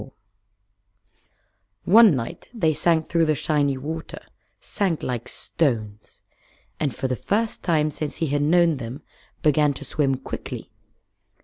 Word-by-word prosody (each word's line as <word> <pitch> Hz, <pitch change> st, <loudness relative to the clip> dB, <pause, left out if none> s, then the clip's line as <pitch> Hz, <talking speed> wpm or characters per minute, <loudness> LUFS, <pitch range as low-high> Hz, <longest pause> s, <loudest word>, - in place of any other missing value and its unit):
One 215 Hz, -4 st, +7 dB
night 115 Hz, -2 st, -6 dB
they 165 Hz, -8 st, +2 dB
sank 160 Hz, +1 st, +2 dB
through 165 Hz, -1 st, +1 dB
the 155 Hz, -, +2 dB
shiny 145 Hz, -2 st, +1 dB
water 160 Hz, +4 st, -6 dB, 0.4 s
sank 190 Hz, -7 st, -2 dB
like 120 Hz, -2 st, -3 dB
stones 110 Hz, -9 st, -3 dB, 0.6 s
and 145 Hz, -4 st, -1 dB
for 130 Hz, -, -2 dB
the 130 Hz, -, -1 dB
first 215 Hz, -, -1 dB
time 155 Hz, -3 st, +2 dB
since 150 Hz, 0 st, -4 dB
he 165 Hz, -, -1 dB
had 145 Hz, -1 st, 0 dB
known 165 Hz, +1 st, +3 dB
them 125 Hz, +3 st, -7 dB, 0.4 s
began 150 Hz, -1 st, +3 dB
to 140 Hz, -, -7 dB
swim 135 Hz, -3 st, +1 dB
quickly. 130 Hz, -, -7 dB
150 Hz, 130 wpm, -23 LUFS, 135-165 Hz, 0.6 s, One